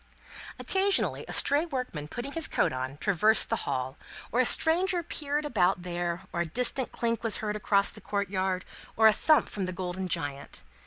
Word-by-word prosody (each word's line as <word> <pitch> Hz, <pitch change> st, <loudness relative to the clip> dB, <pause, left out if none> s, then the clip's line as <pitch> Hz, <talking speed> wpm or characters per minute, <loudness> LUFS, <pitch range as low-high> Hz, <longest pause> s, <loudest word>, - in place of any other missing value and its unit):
Occasionally, 390 Hz, 0 st, 0 dB
a -, -, -7 dB
stray 285 Hz, +3 st, +5 dB
workman 250 Hz, -, -5 dB
putting 245 Hz, -, -6 dB
his 325 Hz, +1 st, 0 dB
coat -, -, 0 dB
on, 130 Hz, +2 st, -5 dB
traversed 210 Hz, +5 st, +3 dB
the -, -, +2 dB
hall, 130 Hz, +2 st, -3 dB, 0.3 s
or 240 Hz, -, 0 dB
a 255 Hz, -, +4 dB
stranger 350 Hz, +2 st, +4 dB
peered 295 Hz, -2 st, -3 dB
about 190 Hz, -9 st, +1 dB
there, 175 Hz, 0 st, -4 dB
or 170 Hz, -, -1 dB
a -, -, -1 dB
distant 250 Hz, -, 0 dB
clink 230 Hz, -1 st, -2 dB
was 225 Hz, -2 st, +3 dB
heard 210 Hz, -1 st, -3 dB
across 200 Hz, -1 st, +2 dB
the -, -, -14 dB
courtyard, 190 Hz, -2 st, -2 dB, 0.3 s
or 220 Hz, -, +4 dB
a 220 Hz, -, +8 dB
thump 310 Hz, +7 st, +3 dB
from 195 Hz, -3 st, -4 dB
the -, -, -3 dB
golden 185 Hz, +1 st, -4 dB
giant. 145 Hz, -5 st, -4 dB
210 Hz, 180 wpm, -28 LUFS, 175-270 Hz, 0.3 s, a